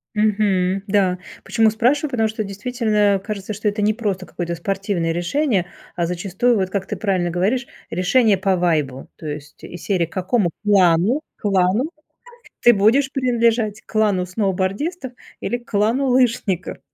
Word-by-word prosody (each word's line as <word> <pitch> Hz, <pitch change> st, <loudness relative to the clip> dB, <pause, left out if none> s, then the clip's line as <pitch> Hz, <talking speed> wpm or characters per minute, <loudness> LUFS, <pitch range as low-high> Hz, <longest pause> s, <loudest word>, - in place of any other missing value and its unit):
Мгм, 200 Hz, -3 st, +1 dB
да. 190 Hz, -3 st, +2 dB, 0.2 s
Почему 225 Hz, -2 st, +3 dB
спрашиваю? 260 Hz, +7 st, +1 dB
Потому 225 Hz, -3 st, +1 dB
что 215 Hz, 0 st, -3 dB
действительно 205 Hz, -1 st, 0 dB
кажется, 210 Hz, -1 st, -5 dB
что 210 Hz, +1 st, -3 dB
это 210 Hz, +1 st, 0 dB
не 215 Hz, +1 st, +3 dB
просто 200 Hz, -5 st, -3 dB
какое-то 170 Hz, -1 st, -4 dB
спортивное 195 Hz, -2 st, -2 dB
решение, 185 Hz, -, 0 dB, 0.3 s
а 170 Hz, -1 st, 0 dB
зачастую, 195 Hz, +7 st, 0 dB
вот 190 Hz, -1 st, 0 dB
как 195 Hz, -2 st, -2 dB
ты -, -, -3 dB
правильно 185 Hz, -5 st, 0 dB
говоришь, 205 Hz, +9 st, 0 dB, 0.2 s
решение 195 Hz, +4 st, +3 dB
по 190 Hz, 0 st, +1 dB
вайбу. 150 Hz, -7 st, 0 dB
То 155 Hz, -, -8 dB
есть 145 Hz, 0 st, -8 dB
из 175 Hz, -, -9 dB
серии: 185 Hz, -4 st, +1 dB
к -, -, -25 dB
какому 185 Hz, 0 st, +1 dB
клану 195 Hz, -, +3 dB, 0.2 s
клану 200 Hz, -, +1 dB, 0.7 s
ты 240 Hz, -, +7 dB
будешь 240 Hz, +7 st, +3 dB
принадлежать, 230 Hz, -4 st, +1 dB
к -, -, -46 dB
клану 205 Hz, -4 st, +2 dB
сноубордистов 200 Hz, -, -2 dB, 0.3 s
или 240 Hz, -, -2 dB
клану 235 Hz, +4 st, 0 dB
лыжников? 235 Hz, -7 st, +1 dB
200 Hz, 150 wpm, -20 LUFS, 185-230 Hz, 0.7 s, ты